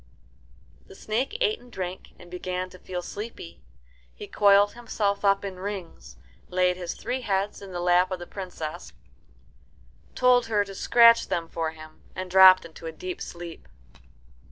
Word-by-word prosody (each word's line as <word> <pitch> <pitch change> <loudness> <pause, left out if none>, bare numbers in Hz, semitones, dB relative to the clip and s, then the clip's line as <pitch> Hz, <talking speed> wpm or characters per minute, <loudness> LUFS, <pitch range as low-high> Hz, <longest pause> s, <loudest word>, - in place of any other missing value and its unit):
The - - -14
snake 250 - -2
ate 445 -2 +1
and 245 0 -18
drank, 185 -3 -6
and 175 0 -15
began 180 0 -4
to 185 - -14
feel 180 -1 -6
sleepy. 200 - -8 0.6
He - - -8
coiled 205 0 +4
himself 210 -4 -2
up 200 0 +3
in 190 -2 -6
rings, 195 -3 -7 0.3
laid 180 0 +2
his 175 -2 -5
three 250 +3 -4
heads 200 -2 -2
in 195 -1 -10
the 175 - -4
lap 180 +1 +3
of 185 - -3
the 175 - -8
Princess, 175 - -7 1.2
told 250 -1 +4
her 210 -2 +2
to 195 - -9
scratch 230 +3 +5
them 165 -1 -2
for 165 -1 -3
him, 155 0 -13
and 185 0 -6
dropped 185 -1 +8
into 165 0 -10
a - - -4
deep 180 +3 -7
sleep. 170 -1 -8
185 Hz, 160 wpm, -26 LUFS, 175-205 Hz, 1.2 s, dropped